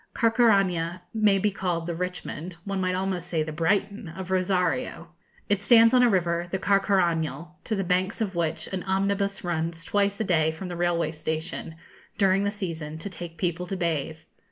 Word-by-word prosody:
Carcaraña 195 -7 +3
may 215 -3 +4
be 205 +2 +1
called 175 -4 -2
the 170 - -2
Richmond 180 -1 -5
one 195 -1 -2
might 185 0 0
almost 185 -2 -2
say 165 -3 0
the 155 - -5
Brighton 200 +6 0
of 190 +2 -7
Rosario. 180 -4 0 0.4
It 200 -1 +1
stands 230 +2 +6
on 250 - +6
a 245 - +6
river, 175 -3 +1
the 190 - -1
Carcarañal, 175 -5 +1
to 220 - -1
the 195 - -1
banks 185 +4 0
of 210 -4 -1
which 165 -2 -1
an 185 - -1
omnibus 200 +1 0
runs 165 -1 -2
twice 200 +1 0
a - - +1
day 160 -5 +2
from 180 +4 -7
the 175 - -4
railway 170 -1 +1
station, 160 +1 -4 0.4
during 195 0 +3
the - - +2
season, 165 -7 -5
to 195 +5 -7
take 170 -2 -8
people 180 +1 -2
to 195 - -3
bathe. 160 -3 -1
180 Hz, 180 wpm, -26 LUFS, 165-195 Hz, 0.4 s, stands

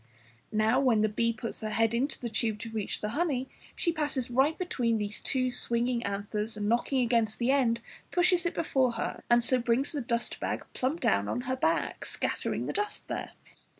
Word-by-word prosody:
Now, 220 +3 +3
when 245 -6 +3
the 215 - +3
bee 230 +2 +1
puts 230 0 -5
her 215 - -3
head 225 +1 +2
into 260 +5 0
the 240 - -3
tube 220 -1 0
to 230 - -6
reach 215 -2 -2
the 210 - -2
honey, 275 -1 0 0.3
she 340 - +1
passes 295 -6 -1
right 270 +6 +3
between 245 - 0
these 205 -1 -2
two 255 -2 0
swinging 240 0 +1
anthers, 210 +2 -2
and 205 0 -2
knocking 240 +4 +2
against 230 -3 +1
the 245 +2 +2
end 235 -4 +2 0.3
pushes 355 -1 +3
it - - -4
before 260 -6 +1
her - - -3
and 240 0 +5
so 255 +1 +5
brings 240 +4 +1
the 290 - -2
dust 235 -1 -1
bag - - -3
plump 280 +6 -1
down 100 - +2
on 245 - -1
her 260 0 -2
back, 320 +5 0
scattering - - -2
the - - -3
dust 415 +1 -3
there! - - -4
240 Hz, 200 wpm, -29 LUFS, 225-270 Hz, 0.3 s, and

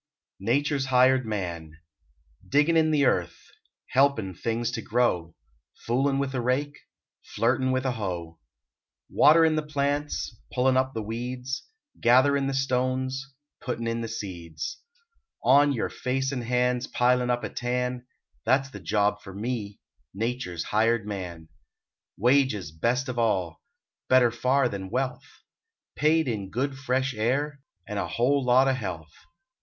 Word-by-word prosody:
NATURE 140 +8 +1
S 135 - -1
HIRED 130 -1 +4
MAN 85 -7 -4 0.8
DIGGIN 150 +4 +3
in 160 -1 +4
the 145 -2 +3
earth, 85 -8 0 0.5
Helpin 130 -8 +2
things 115 +5 -2
to 115 - -4
grow, 105 -9 0 0.5
Foolin 135 +4 +1
with 140 -1 -1
a 130 - -1
rake, 135 +4 0 0.5
Flirtin 130 +3 0
with 130 +1 0
a 130 - +1
hoe; 90 -8 -5 0.7
Waterin 160 +1 +5
the 155 - +1
plants, 145 -5 -2 0.2
Pullin 130 +1 +3
up 130 +1 +1
the 110 - -2
weeds, 125 +4 -5 0.3
Gatherin 135 +3 +4
the 135 - -2
stones, 130 0 -1 0.3
Puttin 120 -2 -3
in 115 0 -1
the 115 - -3
seeds; 85 -8 -6 0.6
On 140 +3 +5
your 125 - -1
face 135 +1 -2
and 125 -4 -3
hands 125 +1 +1
Pilin 125 0 +2
up 120 0 0
a - - -3
tan 125 0 -2 0.4
That 130 +4 +3
s 135 - -11
the 105 - -8
job 105 +2 0
for 95 -1 -11
me, 105 -2 -4 0.4
Nature 115 -2 -2
s 85 - -3
hired 110 +1 +1
man! 90 -6 -6 0.7
Wages 120 - +2
best 120 - 0
of 125 -2 -3
all. 95 -8 0 0.5
Better 130 -2 +5
far 130 +3 +2
than 100 -4 -5
wealth. 130 +3 -4 0.5
Paid 160 +1 +2
in 105 -5 -3
good 135 +6 -2
fresh 130 0 -1
air, 135 +6 -1 0.3
And 105 -1 -3
a - - -2
lot 130 0 +4
o 135 - +3
health. 85 -10 -5
125 Hz, 145 wpm, -26 LUFS, 105-135 Hz, 0.8 s, Waterin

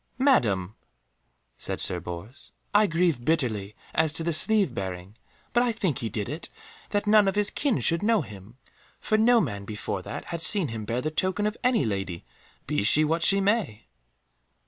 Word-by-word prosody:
"Madam," 110 - +2 0.9
said - - -3
Sir 90 - +1
Bors, 90 - -9 0.2
"I 210 0 +5
grieve 165 -7 +1
bitterly 115 -10 -1 0.2
as 160 -1 +2
to 165 - -4
that 170 0 0
sleeve 210 +5 +2
bearing, 95 +1 -6 0.4
but 240 - +4
I 245 -1 +2
think 190 - -2
he 115 - -3
did 105 0 -3
it 155 +3 -6 0.4
that 205 0 0
none 210 -1 +5
of 195 - 0
his 210 0 +1
kin 280 -7 0
should 165 +1 +2
know 220 0 +3
him. 105 +1 -12 0.4
For 215 - 0
no 230 +2 +5
man 105 - -3
before 105 +1 -4
that - - -7
had 170 - -3
seen 185 -4 +4
him 110 -2 -5
bear 120 +3 -2
the 155 - -2
token 185 +5 -1
of 210 +1 -1
any 250 - +2
lady, 95 -5 -4 0.4
be - - -1
she 145 +9 +4
what 165 +2 0
she 195 +3 +4
may." 195 - 0
160 Hz, 185 wpm, -26 LUFS, -, 0.9 s, I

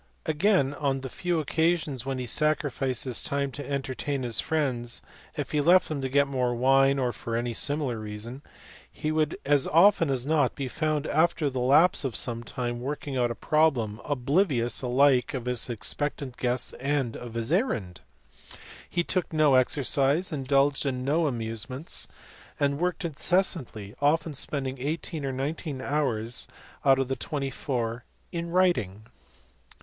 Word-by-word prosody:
Again 155 -3 +2
on 140 -2 -1
the 130 - -6
few 175 -2 -1
occasions 155 -4 0
when 135 -1 -2
he 125 - -3
sacrificed 140 0 +1
his 130 -4 -1
time 140 -1 -2
to 145 +2 -7
entertain 140 0 -2
his 120 -2 -1
friends, 125 -7 -1 0.3
if - - -3
he 150 - +2
left 175 +5 +5
them 150 -3 -3
to 135 - -2
get 140 +2 +3
more 125 -3 0
wine 135 +2 +4
or 125 -2 0
for 115 - -4
any 120 0 -1
similar 140 -2 0
reason, 110 +5 -5 0.5
he 155 - -3
would 155 +1 0
as 145 -1 +3
often 165 0 +5
as 130 -2 0
not 145 -4 +2
be 135 - -3
found 155 +2 -1
after 155 -2 +1
the 130 - -3
lapse 145 +9 +4
of 130 -5 -3
some 115 -2 -1
time 120 -1 -4
working 140 +2 -4
out 120 -2 +2
a 120 - -4
problem, 125 -10 +1
oblivious 135 -2 +1
alike 130 0 +3
of 125 -2 -4
his 125 0 -1
expectant 125 +4 -3
guests 125 0 -1
and 135 -3 -1
of 120 -2 -8
his 115 +4 -2
errand. 145 - 0 0.9
He 175 - 0
took 180 0 -1
no 155 -3 +4
exercise, 140 +6 +2
indulged 140 -1 +2
in 130 -3 -2
no 155 +3 +2
amusements, 120 +3 -3 0.5
and 140 0 +1
worked 180 +1 -1
incessantly, 150 - 0
often 155 +2 +2
spending 135 -1 -3
eighteen 155 +2 -3
or 135 - -1
nineteen 140 +2 -3
hours 125 -5 -1 0.4
out 135 -1 +5
of 135 -1 0
the 135 - -1
twenty 135 +2 -3
four 120 -3 -3 0.3
in 170 -1 -4
writing. 170 - +1
135 Hz, 160 wpm, -27 LUFS, 125-155 Hz, 0.9 s, left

